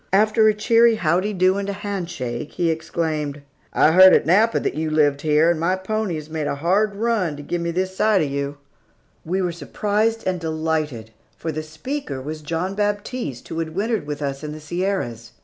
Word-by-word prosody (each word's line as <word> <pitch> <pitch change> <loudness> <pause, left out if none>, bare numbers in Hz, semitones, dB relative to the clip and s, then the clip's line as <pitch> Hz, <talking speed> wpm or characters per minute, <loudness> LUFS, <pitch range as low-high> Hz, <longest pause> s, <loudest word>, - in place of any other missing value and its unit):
After 215 +3 +4
a 215 - +5
cheery 230 +2 +4
"Howdy 180 +2 +1
do" 185 +1 +2
and 200 0 -3
a - - -1
hand 200 -3 -4
shake, 125 +1 -5
he 170 -2 +1
exclaimed, 155 -3 -3 0.3
"I 155 - +4
heard 185 +2 +8
at - - +2
Napa 210 +7 +4
that - - -2
you 155 +1 -2
lived 145 -2 +2
here, 155 +2 +4
and 165 - -1
my 175 +3 +1
pony 195 -1 -2
has 155 -1 -6
made 155 -2 -3
a - - -1
hard 195 +7 +1
run 205 -8 0
to 145 - -8
give 175 +4 -3
me 170 - -2
this 185 +2 -2
sight 210 -3 +3
of - - -1
you." 140 +1 -3 0.7
We 185 +3 -1
were 180 - 0
surprised 210 +6 -1
and 185 -1 0
delighted, 155 -8 -2 0.3
for 160 - -3
the 155 0 -3
speaker 155 - -5
was 155 +4 -6
John 165 +5 -2
Baptiste 205 - -3
who 165 - -4
had 160 -1 -4
wintered 210 -4 -1
with 150 0 -4
us 140 +1 -3
in 150 0 -5
the 155 - -8
Sierras. 155 - -3
170 Hz, 205 wpm, -22 LUFS, 155-200 Hz, 0.7 s, heard